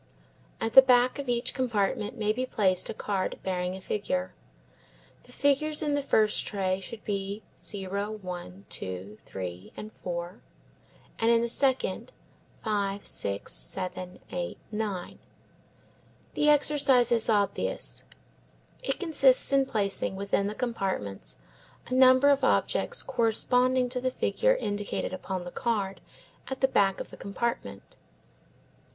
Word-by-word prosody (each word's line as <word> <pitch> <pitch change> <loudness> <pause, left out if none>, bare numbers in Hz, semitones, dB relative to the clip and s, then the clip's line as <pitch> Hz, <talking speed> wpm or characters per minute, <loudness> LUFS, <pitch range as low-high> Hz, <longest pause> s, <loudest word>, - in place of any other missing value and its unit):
At 225 0 -2
the 265 - +12
back 250 0 +4
of 275 -3 -4
each 240 +1 0
compartment 210 -5 -1
may 210 0 +1
be 250 +3 -2
placed 190 -7 +1
a - - -2
card 195 -3 -2
bearing 180 -1 -2
a - - -7
figure. 135 - -2 0.9
The 245 - -16
figures 285 +4 +2
in 295 -1 0
the 285 - +1
first 215 -6 +2
tray 190 -2 0
should 215 +3 -9
be 200 +1 -3
0, 200 +1 -4
1, 180 0 -7
2, 95 +3 -6
3, 90 -1 -7 0.2
4, 175 +2 -5 0.8
and 225 - +3
in 235 0 +4
the - - +1
second, 265 - +1 0.5
5, 200 -2 -1
6, 100 0 -3
7, 180 - -5
8, 175 -1 -3
9. 210 -4 -4 1.1
The 300 - +3
exercise 280 -4 +4
is 230 -1 +3
obvious; 205 -2 0 0.8
it - - -1
consists 275 -7 +3
in 275 -1 +4
placing 200 -3 -1
within 200 0 0
the 210 - -4
compartments 190 - -3 0.5
a - - -5
number 260 +2 +7
of 280 -1 +3
objects - - +1
corresponding 250 +1 +2
to 250 0 -2
the 255 - +1
figure - - +2
indicated 205 - -2
upon 185 -1 -4
the 175 - -6
card 200 -4 -2 0.5
at 265 - -5
the 265 - +5
back 195 -6 +2
of - - -7
the - - -10
compartment. 235 +4 -4
210 Hz, 135 wpm, -28 LUFS, 190-255 Hz, 1.1 s, the